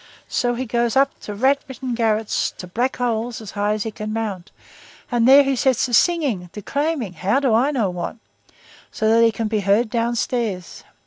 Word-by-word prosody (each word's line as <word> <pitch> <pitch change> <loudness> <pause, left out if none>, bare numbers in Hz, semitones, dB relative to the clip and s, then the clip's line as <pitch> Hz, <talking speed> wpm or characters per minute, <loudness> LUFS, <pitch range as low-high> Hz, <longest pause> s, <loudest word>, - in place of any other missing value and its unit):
So 245 -1 0
he 255 +2 -3
goes 235 +1 0
up 275 +1 +4
to 210 - -7
rat 265 +6 +3
ridden 260 -1 -5
garrets, 220 -2 0
to - - -7
black 240 +9 -1
holes, 235 -1 -2
as 215 -4 -9
high 205 +1 0
as 215 -1 -2
he 225 - -4
can 215 0 -6
mount, 210 -5 -4 0.6
and 240 -1 +2
there 275 +2 +8
he 275 0 0
sets 260 -1 +2
to 245 - -5
singing, 260 - +2
declaiming, 280 - -2
how 195 - +1
do 265 -5 +1
I 245 +6 +3
know 230 -10 0
what? 175 -1 -5 0.8
so 220 - -1
that 230 +1 +5
he 230 - +5
can 225 0 -3
be 215 0 0
heard 205 +3 +2
downstairs! 230 -5 -2
230 Hz, 195 wpm, -21 LUFS, 210-255 Hz, 0.8 s, there